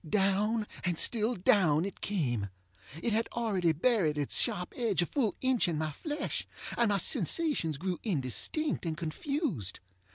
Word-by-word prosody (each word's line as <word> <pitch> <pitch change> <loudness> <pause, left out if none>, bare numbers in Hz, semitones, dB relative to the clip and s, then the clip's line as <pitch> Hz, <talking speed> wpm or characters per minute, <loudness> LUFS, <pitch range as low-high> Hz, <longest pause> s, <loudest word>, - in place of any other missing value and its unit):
Down 210 +3 +2 0.2
and 175 -3 0
still 230 +5 +2
down, 180 -4 +3
it 195 - -7
came. 120 - -1 0.5
It 235 - +1
had 225 +2 +1
already 200 -8 +1
buried 165 - +2
its 145 -2 +1
sharp 180 0 0
edge 220 -8 +1
a - - -1
full 230 - 0
inch 260 -5 +2
in 165 -3 -1
my 155 0 -1
flesh, 295 - -4 0.3
and 235 -2 +3
my 200 - +2
sensations 200 - +1
grew 180 +3 -3
indistinct 180 - 0
and 160 -3 -2
confused. 165 - -3
195 Hz, 155 wpm, -31 LUFS, 160-235 Hz, 0.5 s, down